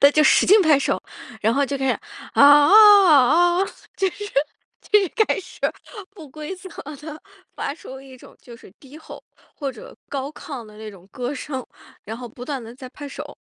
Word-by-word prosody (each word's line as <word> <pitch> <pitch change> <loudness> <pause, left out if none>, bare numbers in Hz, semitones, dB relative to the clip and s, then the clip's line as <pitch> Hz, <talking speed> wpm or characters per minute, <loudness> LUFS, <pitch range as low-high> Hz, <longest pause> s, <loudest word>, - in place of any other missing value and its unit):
他 280 - +7
就 305 +1 +3
使 - - +4
劲 415 +3 +6
拍 310 -5 +4
手， 280 - -2 0.4
然 220 +2 +1
后 280 - +2
就 280 +1 -4
开 270 - -2
始： - - 0 0.4
“啊， - - +4
啊， 290 +1 +7
啊， 350 - +6
啊。” - - +2 0.3
就 390 - 0
是 415 +3 -9 0.7
就 420 - +6
是 390 - -2 0.2
开 - - -1
始 370 - -15 0.6
不 325 -7 -12
规 305 +6 -8
则 375 +1 -12 0.3
地 300 +2 -10 0.4
发 280 - -4
出 265 -4 -11
一 265 -1 -14
种 - - -17
就 240 -2 -13
是 225 - -17
低 275 +1 -15
吼， 315 - -12 0.3
或 280 -3 -4
者 230 - -13
高 275 0 -4
亢 275 -5 -9
的 210 0 -16
那 215 0 -9
种 190 -3 -17
歌 255 +1 -5
声， 260 -2 -6 0.4
然 220 +2 -7
后 245 0 -9
不 240 +2 -11
断 270 -1 -5
地 230 +1 -11
在 255 0 -11
拍 290 +2 -10
手。 - - -9
280 Hz, 220 characters per minute, -21 LUFS, 255-320 Hz, 0.7 s, 他